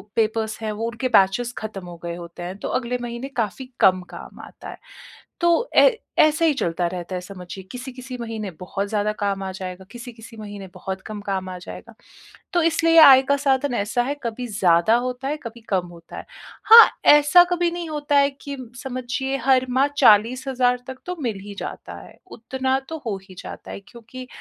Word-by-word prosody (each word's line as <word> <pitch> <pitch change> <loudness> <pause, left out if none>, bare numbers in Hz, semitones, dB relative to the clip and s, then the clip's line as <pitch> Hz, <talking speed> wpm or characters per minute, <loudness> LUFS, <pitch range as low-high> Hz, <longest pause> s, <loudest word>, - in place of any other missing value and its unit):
Papers 220 -1 -1
हैं 215 - -2
वो 225 +2 -3
उनके 235 +2 -3
बैचेज़ 230 +3 +3
खत्म 205 -4 -6
हो 175 - -9
गए 170 0 -4
होते 175 0 -9
हैं, 185 +2 -6
तो - - -6
अगले 250 0 -3
महीने 240 +2 -5
काफ़ी 225 +3 -2
कम 185 -1 +4
काम - - -11
आता - - -12
है, - - -9 0.6
तो 345 +8 +2
ऐ - - +8 0.3
ऐसा 310 +2 +2
ही 315 - +4
चलता 170 +1 -1
रहता 180 +1 -6
है 180 - -4
समझिए। 185 0 -9
किसी-किसी 255 0 -8
महीने 220 -4 -5
बहुत 195 +2 -4
ज़्यादा 210 0 0
काम 200 -2 -1
आ 190 - -4
जाएगा, 185 0 -8
किसी-किसी 235 -2 -11
महीने 205 -2 -8
बहुत 190 0 -6
कम 215 -1 -7
काम 190 -2 -3
आ 185 - -6
जाएगा। - - -11 0.6
तो 345 - +3
इसलिए 330 0 +3
आय 265 -1 +9
का 280 - +3
साधन 275 -1 +1
ऐसा 235 +3 0
है, 280 +4 -3
कभी 235 +2 -4
ज़्यादा 185 -1 +3
होता 250 +1 -5
है, 300 - -2
कभी 230 0 -9
कम 185 -3 0
होता 170 -1 -13
है। - - -8 0.4
हाँ, 460 +1 +10 0.3
ऐसा 295 +4 +6
कभी 350 -1 +1
नहीं 345 -1 -5
होता 290 -1 0
है 280 0 +4 0.2
कि 280 -1 -5 0.3
समझिए 265 +1 -3
हर 260 -1 +4
माह 265 +3 +2
40,000 250 +2 +3
तक 260 0 -8
तो 360 - -3
मिल 225 -7 -3
ही 205 0 -10
जाता - - -7
है, - - -16
उतना 260 +3 -2
तो 320 - -5
हो 205 -3 -2
ही 185 - -13
जाता - - -9
है - - -7
क्योंकि 245 +2 -11
235 Hz, 195 wpm, -22 LUFS, 195-265 Hz, 0.6 s, हाँ